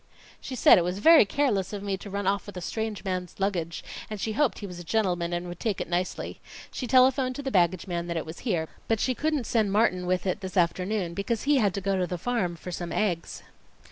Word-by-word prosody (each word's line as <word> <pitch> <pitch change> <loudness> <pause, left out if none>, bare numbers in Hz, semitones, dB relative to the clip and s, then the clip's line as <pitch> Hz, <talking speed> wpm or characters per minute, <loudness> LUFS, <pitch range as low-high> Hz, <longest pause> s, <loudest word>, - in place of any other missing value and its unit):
"She 260 - -6
said 220 - +7
it - - +1
was 180 +2 -2
very 320 +3 +7
careless 210 -6 0
of 200 -1 -5
me 200 -1 -1
to 200 - -9
run 200 0 -3
off 200 +2 0
with 205 - -8
a - - -2
strange 220 +2 -3
man's 185 -3 -3
luggage; 175 -4 -2 0.3
and 215 -1 -5
she 220 - -2
hoped 265 +4 +1
he 205 - -6
was 180 -3 -8
a - - -7
gentleman 175 -3 0
and 175 +1 -2
would 175 0 -7
take 215 -4 -1
it - - -3
nicely. 180 +1 -3 0.3
She 250 - -4
telephoned 255 +1 +4
to 285 - -5
the 270 - -2
baggage 180 -3 +2
man 175 -2 -3
that 170 -1 -2
it 165 - -3
was 160 +1 -8
here, 175 -10 -1 0.2
but 225 -1 +1
she 255 - +1
couldn't 300 -1 -1
send 215 -4 +1
Martin 185 -4 +2
with 185 +1 0
it 190 +1 -1
this 190 0 -5
afternoon 180 +1 +1
because 200 +4 -2
he 290 0 +3
had 205 -7 +2
to 200 - -2
go 195 +1 0
to 180 - 0
the 180 - -3
farm 190 -4 -1
for 180 +2 -8
some 175 0 -5
eggs." 180 -6 -2
195 Hz, 250 wpm, -27 LUFS, 180-225 Hz, 0.3 s, said